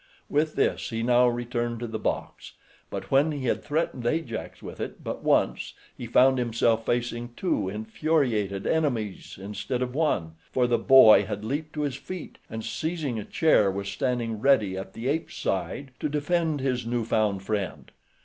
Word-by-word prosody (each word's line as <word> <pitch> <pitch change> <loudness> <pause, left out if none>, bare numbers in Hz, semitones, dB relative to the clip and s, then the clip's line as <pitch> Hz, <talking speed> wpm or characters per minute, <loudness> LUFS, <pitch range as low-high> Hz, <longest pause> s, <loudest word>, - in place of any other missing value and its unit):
With 155 +1 +1
this - - 0
he 115 -1 -2
now 125 +1 +5
returned 120 -1 -2
to - - -2
the 110 -1 -4
box; - - -4 0.4
but - - -6
when 140 +4 +4
he 140 -3 -4
had - - 0
threatened 145 -4 -1
Ajax 125 -5 -3
with - - -8
it - - -6
but - - -5
once - - +1 0.2
he 120 - -7
found 130 +3 +5
himself 115 -1 +1
facing 120 0 -2
two 105 - 0
infuriated 110 -2 0
enemies 125 -11 -1
instead 105 +6 -3
of 125 -1 -4
one, 95 - 0
for 125 - +2
the 120 -1 +2
boy 130 -5 +8
had 105 +1 -5
leaped 150 +6 -3
to 150 - -3
his 145 -3 -2
feet, 185 -3 -8
and 110 0 -5
seizing 155 -8 -2
a - - -4
chair 130 -10 +3
was 100 +1 -3
standing 120 -2 -1
ready 110 -7 +3
at 95 0 -6
the 115 +3 -5
ape's 155 +4 -1
side 95 +9 -2
to 150 - -1
defend 155 0 0
his 125 -2 0
new 115 0 -1
found 105 -4 +1
friend. 100 -2 -3
120 Hz, 175 wpm, -26 LUFS, 110-145 Hz, 0.4 s, boy